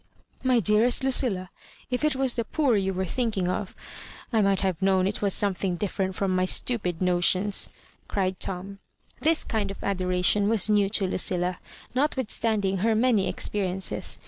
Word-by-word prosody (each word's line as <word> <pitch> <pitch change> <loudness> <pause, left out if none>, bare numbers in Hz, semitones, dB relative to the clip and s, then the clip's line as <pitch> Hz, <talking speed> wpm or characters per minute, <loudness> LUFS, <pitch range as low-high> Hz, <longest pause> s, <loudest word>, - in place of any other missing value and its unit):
" - - -33
My 245 - +4
dearest 220 +5 +3
Lucilla, 225 -9 +1 0.4
if 250 +3 -1
it 305 -3 +2
was 265 -2 +1
the 235 - -1
poor 270 +1 +1
you 195 -1 0
were 190 0 -2
thinking 210 -2 -1
of! 185 +1 -3 0.3
— - - -17
^I 220 -2 +3
might 195 -1 +2
have 190 -2 -1
known 190 -1 +2
it 200 +2 -2
was 200 -2 +2
eomething 190 -3 +1
d&drent 190 -1 -2
from 190 -2 -1
my 185 0 +2
stupid 185 -4 +1
notions," 185 +3 +2 0.4
cried 190 -2 -2
TouL 195 +2 -4 0.4
This 320 +1 +3
kind 210 -3 -2
of 195 - -8
adoration 185 +1 +1
was 215 -1 +3
new 205 -2 +3
to 200 -1 0
Lucilla^ 180 -1 0 0.4
notwithstanding 225 -7 0
her 220 +4 +1
many 225 -3 +2
expe 210 - -2
riences. 185 +1 -1
200 Hz, 170 wpm, -26 LUFS, 185-225 Hz, 0.4 s, My